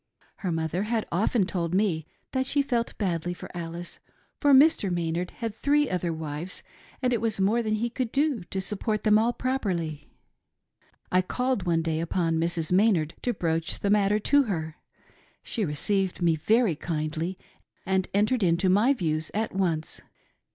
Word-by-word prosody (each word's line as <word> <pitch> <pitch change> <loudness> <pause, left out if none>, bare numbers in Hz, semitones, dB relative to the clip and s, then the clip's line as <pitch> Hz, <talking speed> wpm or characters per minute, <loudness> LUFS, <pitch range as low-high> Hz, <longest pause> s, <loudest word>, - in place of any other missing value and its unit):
Her 185 -4 -3
mother 160 +2 -1
had 220 +1 -1
often 200 +3 +2
told 175 -2 -2
me 175 -6 +1 0.2
that 260 -1 0
she 285 +1 +2
felt 240 -4 -1
badly 175 -3 -1
for - - -10
Alice, 170 0 -6 0.4
for 290 - +2
Mr. 275 -6 +6
Maynard 175 0 -1
had 230 -3 -5
three 290 +5 +2
other 180 -2 -1
wives 160 +2 -4 0.4
and 250 -1 +2
it 230 - 0
was 225 -3 0
more 210 +5 +3
than 215 -1 0
he 235 +3 -1
could 250 -2 -2
do 280 - +1
to 190 - -3
sup 195 +1 -4
port 215 -2 -1
them 215 0 +5
all 230 +2 +2
properly 180 - -2 0.5
" - - -39
I 185 - +4
called 250 0 -1
one 165 -1 +2
day 160 -1 -1
upon 165 -1 0
Mrs. 165 -1 -1
Maynard 180 -5 +3
to 245 - 0
broach 165 -5 -1
the 200 - 0
matter 205 0 +3
to 285 +7 +3
her. 160 -7 -3 0.7
She 225 - -2
received 190 +4 0
me 170 -2 +3
very 215 +3 +2
kindly 160 +3 -3 0.5
and 190 0 +1
entered 215 +5 +2
into 180 0 +3
my 210 +9 +4
views 155 -6 -1
at 220 +1 -1
once. 170 -5 -1
190 Hz, 170 wpm, -27 LUFS, 165-225 Hz, 0.7 s, Mr